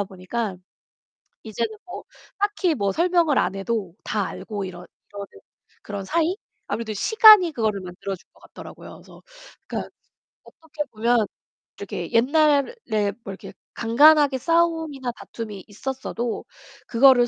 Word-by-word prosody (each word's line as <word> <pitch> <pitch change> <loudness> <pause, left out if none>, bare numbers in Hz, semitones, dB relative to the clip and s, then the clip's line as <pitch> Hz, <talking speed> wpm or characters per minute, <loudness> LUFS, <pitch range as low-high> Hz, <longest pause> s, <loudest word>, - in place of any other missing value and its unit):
편해지다 - - +1
보니까. 190 +2 -4 0.9
이제는 220 0 -3
뭐 355 - -7 0.4
딱히 405 -4 +1
뭐 200 -7 0
설명을 340 - +2
안 - - +1
해도 195 -2 -3
다 205 -3 -1
알고 205 -3 -5
이러 180 -1 -8 0.3
이러는 200 0 -7 0.6
그런 200 -2 -6
사이? 335 - +1 0.3
아무래도 220 +1 -3
시간이 425 - +7
그거를 220 -6 -1
만들어준 185 +1 -7
것 - - -25
같더라고요. - - -12
그래서 - - -16 0.4
그러니까 - - -4 0.6
어떻게 310 -2 -7
보면 230 +1 +2 0.5
이렇게 - - -6
옛날에 275 - +2
뭐 195 - -6
이렇게 190 - -10 0.2
간간하게 285 +4 +5
싸움이나 320 -5 +1
다툼이 210 -5 -8
있었어도 240 +1 -4 0.4
그거를 245 0 +6
235 Hz, 320 characters per minute, -23 LUFS, 205-310 Hz, 0.9 s, 시간이